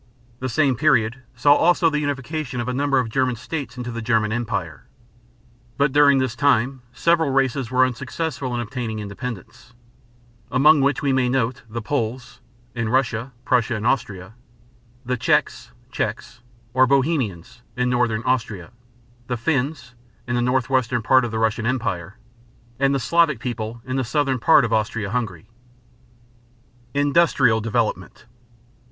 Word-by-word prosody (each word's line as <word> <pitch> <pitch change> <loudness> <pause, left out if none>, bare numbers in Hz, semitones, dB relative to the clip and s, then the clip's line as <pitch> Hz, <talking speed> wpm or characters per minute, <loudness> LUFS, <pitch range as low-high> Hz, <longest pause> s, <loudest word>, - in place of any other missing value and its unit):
The 130 - -3
same 140 0 +2
period 125 -3 +2
saw 145 +4 +5
also 170 +2 +3
the 150 -2 +1
unification 145 -1 -3
of 120 - -3
a 125 - -1
number 140 +1 +1
of 125 -3 +1
German 125 +2 0
states 140 +3 -6
into 120 -1 -5
the 115 0 -5
German 110 -1 +1
Empire. 100 - -3 0.9
But 140 0 +2
during 145 0 +5
this 130 -3 -1
time 130 -2 +1
several 165 +2 +2
races 135 -2 0
were 130 +1 +4
unsuccessful 130 +1 -4
in 120 - -1
obtaining 115 -1 -4
independence, 105 +2 -8 0.7
among 145 +2 +5
which 140 +1 +1
we 140 -2 +2
may 130 -1 +2
note 125 -1 -1
the 115 +1 -5
Poles 125 0 -3 0.3
(in 115 -2 -2
Russia, 125 0 0
Prussia, 120 -1 +1
and 110 +1 -4
Austria), 105 -6 -1 0.7
the 125 +1 -1
Czechs - - 0 0.2
(checks), 120 -1 -4 0.3
or 130 0 +4
Bohemians 130 - -1 0.2
(in 125 0 +1
northern 120 -3 0
Austria), 115 -8 -2 0.6
the 125 - -2
Finns 135 0 -2 0.3
(in 120 - -3
the 120 - +1
northwestern 125 -1 0
part 130 +2 +4
of - - -3
the 110 - -4
Russian 110 0 0
Empire), 100 -7 -2 0.6
and 135 0 +2
the - - 0
Slavic 155 +1 +2
people 115 -1 -5
in 130 0 -3
the 130 - 0
southern 135 +1 0
part 150 +1 +5
of 115 - -2
Austria 110 -2 -1
Hungary. 110 -7 -3 1.5
INDUSTRIAL 145 -6 +3
DEVELOPMENT. 115 +1 -2
125 Hz, 145 wpm, -22 LUFS, 115-135 Hz, 1.5 s, saw